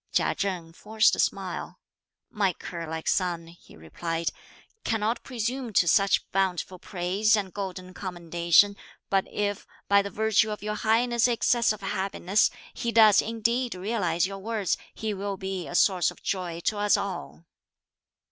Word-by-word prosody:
Chia - - +2
Chen 180 -4 -3
forced 215 +5 +2
a - - -8
smile: - - -2 0.5
"My 200 -4 +1
cur 170 0 -7
like 160 0 -5
son," 175 -3 0
he 170 - -17
replied, 165 - -3 0.5
"cannot 225 +1 0
presume 245 0 -3
to 180 - +4
such 195 +4 +3
bountiful 185 -1 -1
praise 190 +5 +1
and 195 -3 -3
golden 185 -2 -6
commendation; 175 +2 +2 0.3
but 195 -1 +2
if, 205 -1 -2 0.2
by 200 0 +5
the 200 - -5
virtue 220 +1 +2
of 210 -1 -5
your 210 0 -2
Highness' 235 +3 +2
excess 235 -1 +2
of 215 -1 -5
happiness, 195 +1 +1 0.2
he 235 - -2
does 220 -3 +7
indeed 230 +1 -1
realise 180 -3 0
your 195 +1 -5
words, 215 -2 -1 0.2
he 220 -1 -3
will 200 0 -4
be 190 -1 -4
a - - -6
source 185 -2 +4
of - - -13
joy 175 -3 -3
to 210 +4 -1
us 205 0 +3
all!" 180 -3 -5
195 Hz, 155 wpm, -27 LUFS, 180-215 Hz, 0.5 s, does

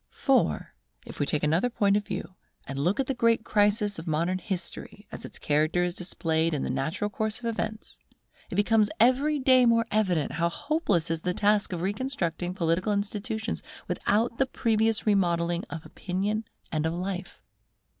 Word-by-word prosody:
For, 270 -2 +1 0.3
if - - -10
we 145 - +1
take 150 - 0
another 165 +10 +2
point 200 -4 +2
of 205 -1 -1
view, 185 -3 -5 0.3
and 135 0 -5
look 180 - +1
at 270 - +2
the 270 - -1
great 230 -2 +2
crisis 205 -2 +2
of 165 - -9
modern 170 +4 0
history, 190 +2 -5
as - - -7
its - - -8
character 155 +4 +1
is 175 -1 -1
displayed 165 -2 0
in 140 - -2
the - - -1
natural 155 +10 -1
course 215 +1 -2
of 245 - -10
events, 220 -1 -4 0.5
it - - -5
becomes 210 0 +3
every 265 +6 +4
day 260 -2 +5
more 230 0 +4
evident 185 -8 +1
how 170 +1 0
hopeless 200 - 0
is 165 -1 -1
the 180 +1 -1
task 210 -1 +2
of 175 -1 -3
reconstructing 190 -5 -2
political 175 +3 +1
institutions 210 +2 -2 0.3
without 230 +3 0
the 270 - +3
previous 225 -3 +1
remodelling 175 -4 +1
of 160 -2 -7
opinion 200 +4 -2 0.3
and 155 0 0
of 165 - -2
life. 185 +1 -4
200 Hz, 175 wpm, -27 LUFS, 170-220 Hz, 0.5 s, day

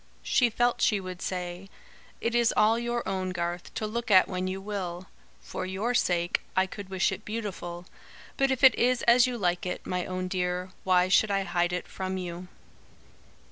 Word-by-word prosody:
She 245 -2 +3
felt 240 +2 +1
she 210 - +3
would 185 -1 -7
say: 180 +1 -4 0.5
"It 230 - -1
is 240 -1 +3
all 220 +2 +4
your 240 0 -2
own, 185 -1 -2
Garth, 175 -1 -4
to 215 - -2
look 235 +2 -3
at 185 -3 +6
when 185 0 -2
you 190 +1 -3
will. 190 -3 -5 0.4
For - - -5
your 200 +6 -1
sake, 175 -6 +1
I 190 - +4
could 195 0 -9
wish 190 -1 +1
it 190 - -6
beautiful; 190 -5 -5 0.5
but 270 0 +2
if 265 0 -1
it 265 -3 +9
is 250 +1 +1
as 240 +1 +6
you 250 -1 -3
like 180 -4 0
it, 180 - -4
my 180 -1 -2
own 185 0 -3
Dear, 180 0 -2
why 180 -1 +4
should 200 +3 +4
I 195 -1 +1
hide 175 -1 0
it 180 - -3
from 190 0 -4
you?" 180 0 -6
190 Hz, 190 wpm, -28 LUFS, 180-225 Hz, 0.5 s, it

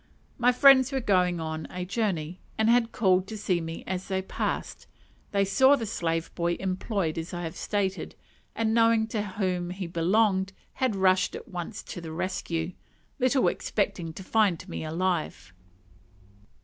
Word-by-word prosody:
My 245 +1 +5
friends 260 +1 +6
were 270 - 0
going 180 -7 +2
on 160 -1 -4
a 180 0 -5
journey, 185 -5 -2 0.2
and 220 - +2
had 235 -1 +3
called 190 -3 +2
to 220 - -6
see 180 -4 0
me 165 0 -6
as 185 0 -4
they 190 -1 -1
passed. - - -3 0.4
They 200 -1 +2
saw 265 +8 +5
the 235 -5 -3
slave 165 -5 -2
boy 170 0 0
employed 190 -3 -2
as 165 +2 -6
I 175 - -4
have 165 -1 -5
stated, 200 -2 -2 0.4
and 225 -1 +1
knowing 230 -1 +4
to 215 - -1
whom 185 -3 -2
he 185 +1 -5
belonged 190 +3 +1 0.2
had 255 -5 0
rushed 190 -1 +3
at - - -8
once 175 -2 -6
to 175 - -7
the 165 -1 -7
rescue, 170 -1 -2 0.5
little 260 0 +3
expecting 175 -5 -1
to 190 - -9
find 190 -4 +1
me 170 - -5
alive. 160 - -2
190 Hz, 160 wpm, -27 LUFS, 175-220 Hz, 0.5 s, friends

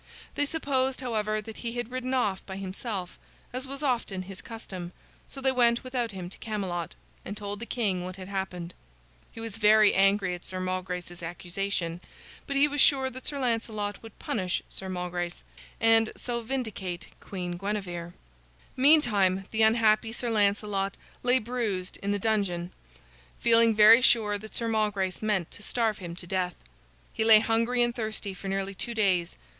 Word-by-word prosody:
They 290 - 0
supposed, 265 -4 0
however, 215 -3 -1
that 220 +1 -9
he 235 -1 -4
had 240 -1 -4
ridden 255 0 -2
off 205 -7 0
by 190 - -6
himself, 195 -1 -5 0.3
as 255 +1 -3
was 275 +2 -5
often 235 -8 0
his 190 0 -9
custom, 185 -6 -7 0.3
so 275 - -9
they 265 0 +3
went 240 -2 +3
without 250 -2 -2
him 185 -4 -6
to - - -10
Camelot, 190 -6 -3 0.3
and 205 - -6
told 205 -1 -5
the 235 - -7
king 200 -7 0
what 185 0 -6
had 185 -1 -9
happened. 190 -3 -4 0.6
He - - -10
was 225 -2 -5
very 215 -1 +6
angry 195 -1 +3
at 175 - -7
Sir 185 - -4
Malgrace's 180 -1 -4
accusation, 175 0 -3 0.5
but 280 - -3
he 280 +2 +5
was 290 -1 0
sure 265 -2 +4
that 260 +1 -8
Sir 285 - -3
Lancelot 225 -5 -1
would 225 -2 -12
punish 185 -4 -2
Sir 190 - -5
Malgrace, 180 -1 -3 0.4
and 225 -1 +4
so 240 -1 -3
vindicate 220 -8 -4
Queen 180 -3 -5
Guinevere. 175 -3 -4 0.6
Meantime, 215 -10 +4
the 220 - 0
unhappy 220 0 +4
Sir 240 0 -2
Lancelot 200 -2 +1 0.2
lay 250 +1 +4
bruised 220 -6 -2
in 200 - -4
the 205 - +1
dungeon, 195 -5 0 0.7
feeling 230 -1 +5
very 220 +3 +9
sure 210 -4 +4
that 220 +1 -10
Sir 230 - -1
Malgrace 210 -4 0
meant 205 -6 0
to - - -9
starve 225 -1 0
him 170 -3 -6
to 175 - -6
death. 180 0 -1 0.6
He - - 0
lay 220 -1 +8
hungry 230 +2 +2
and 240 0 +1
thirsty 215 -3 -3
for 190 +1 -8
nearly 195 0 -2
two 235 +4 -4
days. 185 -6 +2
210 Hz, 170 wpm, -28 LUFS, 185-235 Hz, 0.7 s, very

